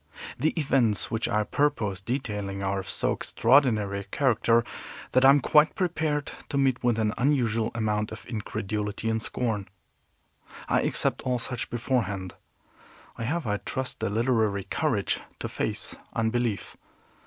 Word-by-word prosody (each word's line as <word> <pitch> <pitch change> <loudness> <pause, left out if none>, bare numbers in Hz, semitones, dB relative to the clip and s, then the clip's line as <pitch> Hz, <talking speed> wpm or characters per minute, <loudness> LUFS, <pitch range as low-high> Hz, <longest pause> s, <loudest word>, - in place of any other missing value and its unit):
The 155 - +3
events 130 -8 +2
which 115 0 -1
I 105 0 +2
purpose 105 -7 0
detailing 105 -5 -3
are 95 0 0
of 95 - -7
so - - 0
extraordinary 115 -6 +3
a - - -6
character 115 0 +2 0.5
that 130 - +4
I 135 - +9
am 140 0 +6
quite 150 +4 +4
prepared 160 -6 -1 0.2
to 140 - -1
meet 135 -2 +2
with 120 -2 +2
an 110 -1 +1
unusual 120 -5 +2
amount 105 -2 0
of 110 - -9
incredulity 105 -1 -3
and 110 0 0
scorn. 110 -4 -2 1.0
I - - +2
accept - - +1
all 125 -1 0
such 120 +1 -4
beforehand. 105 -7 -1 0.8
I 115 - -4
have, 160 +4 -1
I 105 -1 0
trust, 130 +4 -4
the - - -1
literary 110 -3 +1
courage - - 0 0.2
to - - -4
face - - -3 0.2
unbelief. 115 -1 -1
115 Hz, 145 wpm, -27 LUFS, 105-130 Hz, 1.0 s, I